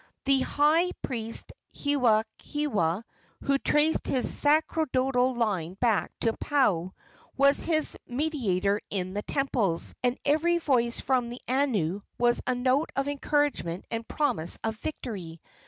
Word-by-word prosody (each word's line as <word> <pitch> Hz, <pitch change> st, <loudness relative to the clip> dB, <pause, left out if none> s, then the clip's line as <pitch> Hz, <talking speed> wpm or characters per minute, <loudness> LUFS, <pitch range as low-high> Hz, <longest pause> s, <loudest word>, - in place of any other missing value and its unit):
The 270 Hz, 0 st, +4 dB
high 310 Hz, +7 st, +2 dB
priest 230 Hz, -3 st, -3 dB, 0.2 s
Hewahewa, 225 Hz, -, 0 dB, 0.4 s
who 275 Hz, 0 st, +2 dB
traced 300 Hz, +3 st, +2 dB
his 255 Hz, -, +3 dB
sacerdotal 270 Hz, -4 st, +2 dB
line 190 Hz, -7 st, -1 dB
back 225 Hz, 0 st, +1 dB
to 225 Hz, -, +2 dB
Paao, 200 Hz, -, +1 dB, 0.4 s
was 280 Hz, +1 st, +4 dB
his 310 Hz, -2 st, +1 dB
mediator 230 Hz, -, 0 dB
in 185 Hz, -2 st, -3 dB
the 205 Hz, -, -2 dB
temples, 220 Hz, -10 st, -1 dB
and 250 Hz, 0 st, +1 dB
every 320 Hz, +4 st, +3 dB
voice 245 Hz, -7 st, +1 dB
from 250 Hz, -3 st, 0 dB
the 240 Hz, +1 st, -7 dB
anu 220 Hz, -, 0 dB, 0.2 s
was 240 Hz, 0 st, +3 dB
a 255 Hz, -, +2 dB
note 255 Hz, +5 st, +1 dB
of 275 Hz, +1 st, 0 dB
encouragement 285 Hz, -, -1 dB
and 230 Hz, 0 st, -4 dB
promise 175 Hz, -, 0 dB
of 225 Hz, 0 st, -1 dB
victory. 200 Hz, -, -6 dB
250 Hz, 125 wpm, -27 LUFS, 210-285 Hz, 0.4 s, The